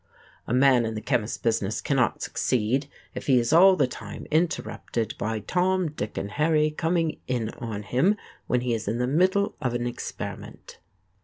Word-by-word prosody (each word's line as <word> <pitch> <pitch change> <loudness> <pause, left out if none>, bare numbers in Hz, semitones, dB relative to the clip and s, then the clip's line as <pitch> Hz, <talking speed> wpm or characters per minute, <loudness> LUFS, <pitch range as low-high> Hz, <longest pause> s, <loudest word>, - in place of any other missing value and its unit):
A - - -4
man 130 -2 +5
in 110 -1 -3
the - - -2
chemist 115 -1 -1
business 110 -3 0
cannot 135 -4 0
succeed 125 +4 0 0.2
if - - -7
he 130 -3 +5
is 120 +2 +1
all 190 +3 +8
the - - +3
time 110 -4 -8
interrupted 155 -7 -1
by 110 0 -2
Tom, 180 - +1
Dick 110 -8 -5
and 100 - -3
Harry 150 +3 +2
coming 165 +1 0
in 120 -4 -1
on 110 -3 -5
him 165 - +2 0.3
when 125 - +1
he 125 -1 0
is 115 -1 -3
in 115 - 0
the 125 - +1
middle 185 +9 +2
of 125 -4 -1
an 120 0 -1
experiment. 120 0 -7
125 Hz, 175 wpm, -26 LUFS, 115-160 Hz, 0.3 s, all